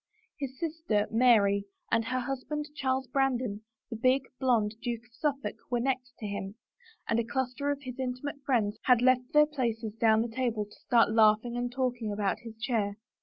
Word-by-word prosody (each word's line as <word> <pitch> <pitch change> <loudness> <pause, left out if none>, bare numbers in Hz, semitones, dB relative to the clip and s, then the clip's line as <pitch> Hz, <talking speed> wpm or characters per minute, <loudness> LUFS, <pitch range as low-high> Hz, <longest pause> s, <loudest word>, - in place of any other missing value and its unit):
His 265 -2 -5
sister, 320 -11 0
Mary, 215 -4 +4 0.3
and 225 0 +3
her 255 +2 -1
husband, 275 +4 -4
Charles 260 -1 0
Brandon, 250 -5 0 0.3
the - - -3
big, 255 +4 +3 0.2
blond 230 -5 +2
Duke 235 -2 -3
of 235 - -27
Suffolk, 280 0 -2
were 245 -1 +1
next 255 0 -2
to 215 - -7
him, 200 -1 -4 0.5
and 230 - +2
a - - +1
cluster 260 +3 -2
of 285 0 -2
his 250 -1 -7
inti 255 0 -3
mate 285 -1 -5
friends 220 -6 +1
had 250 -2 +5
left 255 +1 +3
their 300 -1 +6
places 230 -7 -2
down 220 0 +3
the 230 -1 -7
table 230 -5 0
to 210 - -19
stand 230 -2 +4
laughing 220 +2 +4
and 245 0 -2
talking 245 -4 -1
about 205 -1 -1
his 225 -1 -10
chair. 220 -3 -1
245 Hz, 185 wpm, -29 LUFS, 220-260 Hz, 0.5 s, their